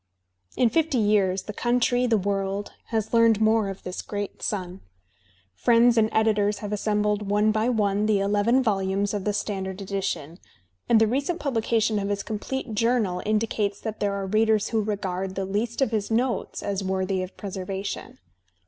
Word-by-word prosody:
In 240 -3 +3
fifty 320 -4 +1
years 205 -4 +2
the 210 - -7
country, 245 +2 +1
the 225 -2 +3
world, 195 0 -2 0.2
has 220 -1 -2
learned 230 -2 +5
more 220 -1 +3
of 195 - -8
this 180 - -5
great 205 -1 -5
son. 185 -3 -3 0.7
Friends 235 - +4
and 220 -1 +3
editors 210 -2 +2
have 210 -1 -5
assembled 210 -1 0
one 210 +1 +3
by 215 +3 +1
one 210 -3 +1
the 210 -2 +3
eleven 205 +6 +2
volumes 195 -2 0
of 205 -2 -3
the 210 - +2
standard 190 -2 -3
edition; 190 -4 -4 0.5
and 230 - +6
the 225 - +5
recent 280 +9 -1
publication 225 -5 +1
of 200 0 -2
his 200 0 -2
complete 230 +3 -4
journal 220 -4 +1
indicates 215 -2 0
that 220 -1 -5
there 200 -1 0
are 195 -1 -3
readers 215 +1 +2
who 225 -2 +1
regard 195 -2 -3
the 195 - -2
least 220 +6 -1
of 255 - -1
his 215 -3 -1
notes 235 +2 -1
as 200 -1 -2
worthy 190 0 -1
of 185 0 -7
preservation. 195 0 -5
210 Hz, 170 wpm, -25 LUFS, 195-225 Hz, 0.7 s, and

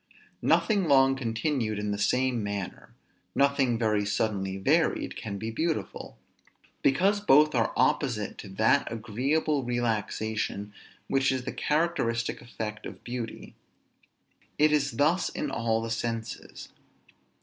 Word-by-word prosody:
Nothing 205 -4 +3
long 135 -3 +5
continued 115 -2 -1
in 105 0 -2
the 100 - -2
same 125 +2 +1
manner, 100 -2 -5 0.4
nothing 140 -3 +3
very 110 -2 +1
suddenly 100 -2 -1
varied, 95 - +1
can 100 -2 -5
be 110 +3 -4
beautiful; 160 +7 -3 0.6
because 195 +9 +3
both 150 -4 +5
are - - +1
opposite 125 -9 +1
to 100 - -8
that 110 +4 +2
agreeable 130 +7 0
relaxation 110 -3 -2 0.3
which 135 -1 +2
is 130 -1 -2
the - - -4
characteristic 150 -8 0
effect 110 -2 -6
of - - -11
beauty. 120 -2 -6 1.0
It 150 +1 +4
is 140 -3 +1
thus 155 +9 +2
in - - -4
all 115 -1 0
the 115 - -4
senses. 115 -1 -4
120 Hz, 125 wpm, -28 LUFS, 110-140 Hz, 1.0 s, long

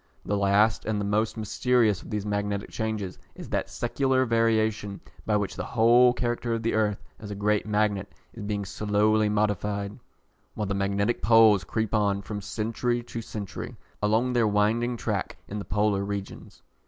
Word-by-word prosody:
The 105 - 0
last 100 +2 +3
and 110 -1 -1
the 100 - -2
most 110 +3 0
mysterious 110 -1 +1
of - - -12
these 105 -2 -3
magnetic 105 -1 -2
changes 110 -4 -3 0.2
is - - -9
that - - -1
secular 130 +2 +1
variation 110 -3 +1 0.3
by 105 -1 +3
which 100 -2 -2
the - - -4
whole 120 +2 +5
character 120 -1 -1
of 115 - -4
the 115 - 0
earth, 105 -2 0 0.2
as 105 - -8
a 105 - -5
great 105 +1 0
magnet, 105 -2 0 0.2
is 115 - -9
being 105 -1 -3
slowly 105 +2 +1
modified, 105 0 -1 0.6
while 105 - -2
the 100 - -2
magnetic 100 +3 0
poles 110 -4 +6
creep 110 +3 -2
on, 100 -2 +1
from 105 +1 -5
century 115 +4 -2
to 115 -1 -6
century, 105 -3 -6 0.3
along 110 +4 +2
their 120 -3 +3
winding 110 +4 +1
track - - -3
in 105 - -5
the 100 - -6
polar 105 -1 +1
regions. 100 -1 -6
105 Hz, 170 wpm, -26 LUFS, 100-115 Hz, 0.6 s, poles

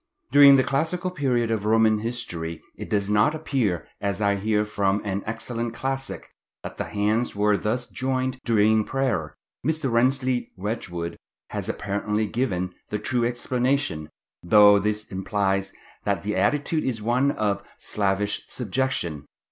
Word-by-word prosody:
During 140 0 +9
the 130 - +4
classical 170 +7 -1
period 125 -8 0
of 110 -3 -1
Roman 110 0 +4
history 85 -8 -4 0.2
it - - -8
does 100 -2 +1
not 105 +9 +3
appear, 130 - -1
as 100 -1 -1
I 100 -1 +2
hear 105 +1 +1
from 100 -1 0
an 100 0 -1
excellent 115 +1 -4
classic, 135 +1 -4 0.3
that - - -7
the - - -2
hands 105 +4 0
were 105 0 +3
thus 120 +4 -2
joined 130 0 -2
during 110 -1 +3
prayer. 105 - -1 0.3
Mr. 155 -2 0
Rensleigh 125 +1 +2
Wedgwood 90 -4 -4 0.3
has - - -4
apparently 105 +1 -1
given 95 -6 -1 0.2
the 105 - -1
true 120 +3 -1
explanation, 125 - 0 0.3
though 105 +2 +7
this 105 +1 -1
implies 95 0 -1 0.3
that 100 -1 -1
the 105 +1 -2
attitude 150 +2 +1
is 120 -4 -1
one 125 +5 +2
of 105 -7 0 0.2
slavish 100 0 -1
subjection. 100 - -2
110 Hz, 140 wpm, -25 LUFS, 100-130 Hz, 0.3 s, During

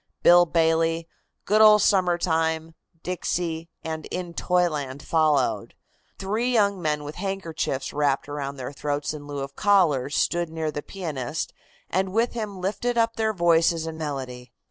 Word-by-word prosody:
"Bill 175 0 +7
Bailey," 165 0 +1 0.4
"Good 215 +1 +3
Old 210 -1 +7
Summer 180 -3 +3
Time," 160 -1 0 0.3
"Dixie" 170 -2 -3
and 160 -1 -5
"In 180 -2 -5
Toyland" 150 -7 0
followed. 155 -5 +1 0.4
Three 215 +6 -1
young 200 -5 +2
men 150 -2 -1
with 145 +1 -6
handkerchiefs 175 -8 -3
wrapped 145 -2 0
about 140 -1 -5
their 130 +1 -5
throats 145 +1 -2
in 145 -1 -9
lieu 145 -1 -4
of 135 0 -6
collars 155 -10 +2
stood 175 -1 +1
near 160 -1 -3
the 145 - -4
pianist 155 -7 -4 0.3
and 190 0 -1
with 230 +2 +1
him 210 -5 -5
lifted 225 +6 -2
up 230 0 +2
their 220 -1 +1
voices 170 -3 +2
in 160 -1 -5
melody. 130 -5 -5
165 Hz, 150 wpm, -25 LUFS, 145-190 Hz, 0.4 s, Bill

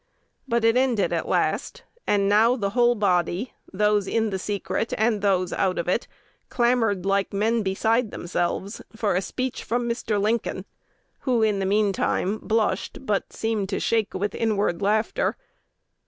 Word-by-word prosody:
But 235 -2 +1
it 230 +1 +4
ended 255 -5 +2
at - - -1
last; - - -1 0.2
and 200 -1 +2
now 220 +4 +4
the 200 -5 -2
whole 240 +1 +3
body, 190 +2 0 0.2
those 210 0 +2
in 225 -2 0
the 190 - -2
secret 205 +3 -2
and 220 -1 +1
those 185 -3 +1
out 185 -1 0
of 170 - -2
it, 185 +6 0 0.4
clamored 235 -6 +1
like 195 0 +1
men 220 +3 +1
beside 220 +4 +1
themselves 175 +3 -3
for 220 -2 0
a 180 - +1
speech 255 +5 -4
from 240 +1 -1
Mr. 230 -3 -1
Lincoln, 220 +3 -1 0.5
who 245 -4 +1
in 210 -2 +2
the 190 - -1
mean 205 0 +2
time 200 +2 0
"blushed, 225 +4 -1
but 205 -5 -1
seemed 220 -3 -2
to 200 - -1
shake 225 -2 0
with 200 +1 -2
inward 205 -5 0
laughter." 215 - +1
210 Hz, 160 wpm, -24 LUFS, 195-230 Hz, 0.5 s, it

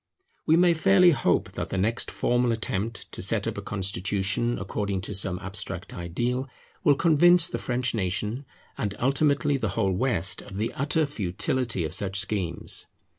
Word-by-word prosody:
We 160 +1 +5
may 175 0 +5
fairly 180 +2 +5
hope 145 - +1
that - - -5
the - - -3
next 110 +5 0
formal 120 0 +1
attempt 115 0 -3
to - - -7
set - - +2
up - - -2
a - - -6
constitution 100 +3 0
according 100 0 -3
to 100 - -6
some 95 -2 0
abstract 95 0 -5
ideal, 120 +10 -2 0.3
will 145 -5 +5
convince 170 +2 +5
the - - -3
French 125 0 -1
nation, 105 +6 -2 0.3
and 100 -1 -2
ultimately 140 +1 +2
the 110 -5 -2
whole 100 -4 +2
West, 95 -4 0
of 95 - -10
the 110 +2 -2
utter 150 +3 +1
futility 115 - -2
of 80 - -5
such 100 0 -1
schemes. 95 -5 -1
115 Hz, 165 wpm, -26 LUFS, 95-135 Hz, 0.3 s, We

